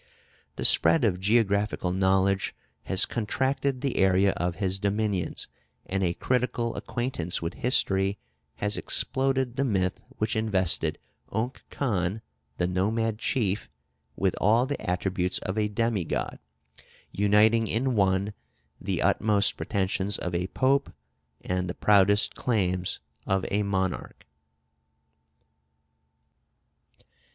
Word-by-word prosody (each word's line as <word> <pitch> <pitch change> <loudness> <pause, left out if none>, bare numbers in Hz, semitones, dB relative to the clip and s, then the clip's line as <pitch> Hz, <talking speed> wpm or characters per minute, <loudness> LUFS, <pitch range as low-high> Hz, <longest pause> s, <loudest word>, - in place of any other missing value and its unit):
The - - -3
spread 80 +5 +5
of 90 -5 +1
geographical 100 -2 +1
knowledge 95 +1 +1 0.3
has 95 - +2
contracted 130 +4 -1
the 135 -2 -1
area 95 +1 +4
of 90 -1 -2
his 95 -1 0
dominions, 100 -3 -1 0.4
and 95 +1 -2
a 85 -1 0
critical 125 -2 -1
acquaintance 120 -9 -2
with 85 +2 -4
history 100 -5 +1 0.4
has 105 +7 -2
exploded 130 -2 +1
the 140 - +2
myth 95 -7 0 0.2
which 110 +1 -1
invested 95 -7 +1 0.3
Unk 115 +5 -3
Khan, 105 -5 -1 0.3
the 90 - +1
nomad 105 +5 0
chief, 105 -8 -1 0.5
with - - 0
all 115 +5 +4
the 145 +1 -4
attributes 90 0 0
of 95 - -4
a 105 -1 +1
demigod, 105 -3 -2 0.7
uniting 105 +3 +3
in 125 +5 0
one 100 -1 +1 0.5
the - - -1
utmost 105 -2 +2
pretensions 95 0 -1
of 90 - -4
a 90 +1 -1
Pope 135 +6 +1 0.5
and 90 0 -2
the 90 - -4
proudest 100 0 +4
claims 90 -6 -1 0.3
of 95 -1 +1
a 105 - +1
monarch. 95 -2 -2
100 Hz, 115 wpm, -27 LUFS, 95-115 Hz, 0.7 s, spread